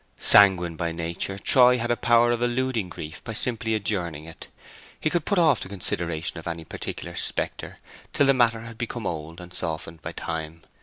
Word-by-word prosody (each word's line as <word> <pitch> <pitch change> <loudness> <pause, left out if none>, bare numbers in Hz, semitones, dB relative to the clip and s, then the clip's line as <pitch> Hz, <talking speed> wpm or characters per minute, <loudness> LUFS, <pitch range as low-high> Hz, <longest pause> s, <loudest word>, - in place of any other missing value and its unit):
Sanguine 90 -5 +6
by 85 +1 -2
nature, 85 +4 -3
Troy 125 +4 +5
had 120 0 -1
a - - +3
power 120 0 +3
of 120 0 -1
eluding 120 -4 -1
grief 80 -2 -8
by 115 - -6
simply 110 0 -1
adjourning 85 -8 -3
it. 80 - -11 0.5
He 155 - -1
could 175 -4 -1
put 200 - 0
off 160 -7 +4
the - - -6
consideration 85 -4 -3
of 80 - -10
any 85 -1 -5
particular 85 +2 -6
spectre - - -1 0.3
till 145 - +2
the 135 - +5
matter 115 -3 +2
had 115 0 -10
become 120 -2 -4
old 80 0 -5
and 90 0 -11
softened 80 -1 -4
by - - -6
time. 80 0 -5
95 Hz, 190 wpm, -25 LUFS, 85-120 Hz, 0.5 s, Sanguine